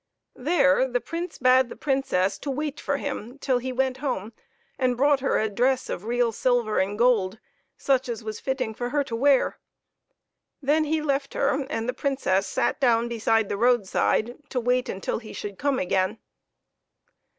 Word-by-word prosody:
There 260 - +3
the 245 -1 0
Prince 335 +5 -5
bade 255 0 +4
the - - -8
Princess 265 -10 0
to 290 - -5
wait 295 +1 -3
for 280 - -1
him 270 -3 -5
till 260 -3 0
he 260 +1 -4
went 260 0 0
home 245 -6 -3 0.5
and 250 -2 +1
brought 285 +1 +4
her 270 - +1
a 220 - +1
dress 250 +5 0
of 185 - -5
real 240 0 +1
silver 240 -2 +1
and 200 +2 -1
gold, 225 -5 +2 0.4
such 265 -2 +1
as 230 -1 -4
was 215 -1 -5
fitting 260 -4 -2
for 245 +2 -4
her 290 +2 +1
to 240 -4 -5
wear. 270 +2 +3 1.0
Then 300 +2 +2
he 310 0 0
left 275 -1 -1
her, 280 -1 0
and 225 -6 -2
the 250 - -1
Princess 230 -9 0
sat - - 0
down 235 -3 +3
beside 225 -2 +1
the 200 - -3
roadside 240 0 +1
to 255 - -1
wait 250 +1 +1
until 190 - -3
he 225 - -11
should 205 -2 -7
come 285 -2 +1
again. 185 +1 0
250 Hz, 175 wpm, -25 LUFS, 225-275 Hz, 1.0 s, bade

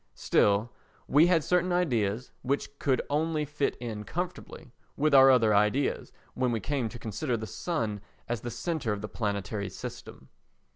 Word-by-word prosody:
Still, 105 +4 +2 0.4
we 155 +4 +5
had 170 -3 +3
certain 180 +2 +1
ideas 125 - 0
which 140 +2 -2
could 135 -3 +1
only 155 +1 0
fit 145 -1 -1
in 110 -3 -6
comfortably 175 -5 -6 0.3
with 150 +1 +2
our 135 -1 +9
other 115 -5 +5
ideas 105 +7 +1 0.2
when 125 -1 0
we 115 - 0
came 130 +1 -2
to 120 - -9
consider 120 +3 -2
the 110 - -5
sun 110 - -3 0.3
as 120 -2 -2
the 120 - -4
centre 120 -1 -2
of 100 - -5
the 105 - -4
planetary 100 -2 -3
system. - - -9
125 Hz, 160 wpm, -29 LUFS, 110-150 Hz, 0.4 s, our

